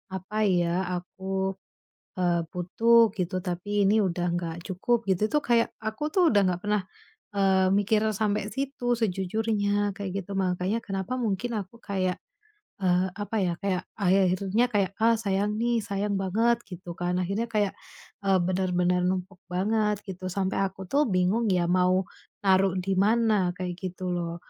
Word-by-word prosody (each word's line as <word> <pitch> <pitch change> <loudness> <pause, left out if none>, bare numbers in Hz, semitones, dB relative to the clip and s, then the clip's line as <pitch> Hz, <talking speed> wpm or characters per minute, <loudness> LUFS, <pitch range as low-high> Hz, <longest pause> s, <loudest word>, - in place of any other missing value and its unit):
apa 205 +4 -2
ya, 175 -1 +2
aku, 190 +2 -3 0.6
eee, 175 -2 +2
butuh 225 +6 +4
gitu, 185 -1 -1
tapi 200 +3 -1
ini 215 +2 +4
udah 175 -1 -1
enggak 170 -2 -3
cukup, 225 +5 0
gitu. 195 +3 +2
Itu 300 - +3
tuh - - -22
kayak, 235 -1 +4
aku 220 +6 -3
tuh 370 - +3
udah 205 - +5
enggak 180 -1 0
pernah, 210 -1 +1 0.5
eee, 190 -1 +3
mikir 205 +2 +2
sampai 210 -1 0
situ 270 -3 -1
sejujurnya, 205 0 0
kayak 200 -2 -4
gitu. 200 - -11
Mangkanya 185 +2 0
kenapa 195 +4 -3
mungkin 235 +1 -1
aku 200 +3 -9
kayak, 185 -2 -1 0.6
eee, 180 -1 +2
apa 205 +2 -4
ya, 180 -3 +1
kayak 190 -2 0
akhir-akhirnya 195 +3 +2
kayak, 200 -3 +2
"Ah 230 +1 +5
sayang 205 0 0
nih. 235 0 +2
Sayang 200 +1 -2
banget." 225 +5 +2
Gitu 180 -1 -9
kan. 175 0 -1
Akhirnya 195 +6 -1
kayak, 210 -3 +1 0.5
eee, 195 -1 +4
benar-benar 180 -1 +1
numpuk 185 0 -3
banget, 210 +3 0
gitu. 185 -1 -6
Sampai 190 0 -1
aku 190 0 -5
tuh 295 +2 +3
bingung 190 +4 +1
ya 180 -1 +2
mau 185 +1 +3 0.4
naruh 190 -1 +4
di 185 +1 -1
mana, 210 -3 +3
kayak 180 -1 -3
gitu 185 -1 -4
loh. 170 -1 -3
195 Hz, 155 wpm, -27 LUFS, 180-210 Hz, 0.6 s, udah